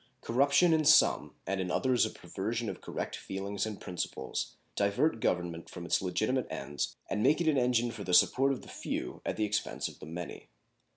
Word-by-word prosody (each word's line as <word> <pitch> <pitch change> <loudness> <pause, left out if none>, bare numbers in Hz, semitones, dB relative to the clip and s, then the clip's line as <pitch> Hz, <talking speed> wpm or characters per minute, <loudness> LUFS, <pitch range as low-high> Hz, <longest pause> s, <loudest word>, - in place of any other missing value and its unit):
Corruption 140 +7 +4
in 160 -1 +3
some - - +5
and 95 -1 -1
in 90 - -3
others 125 +6 +2
a - - -5
perversion 110 +3 -4
of 95 - -10
correct - - -4
feelings 100 +2 -3
and 105 -2 -6
principles 85 -6 -4 0.2
divert 105 +7 +2
government 85 -4 -1
from 85 -2 -8
its - - +2
legitimate 110 +7 0
ends 70 +2 -3
and 105 - -1
make 150 +8 +4
it 170 - 0
an 155 - +4
engine 120 -1 +2
for 110 -3 -7
the 90 - -3
support 135 +9 +5
of 135 - -4
the - - -13
few - - -4
at - - -2
the 110 - +2
expense 105 0 -1
of - - -11
the - - -9
many. 85 +2 -7
105 Hz, 195 wpm, -31 LUFS, 90-130 Hz, 0.2 s, some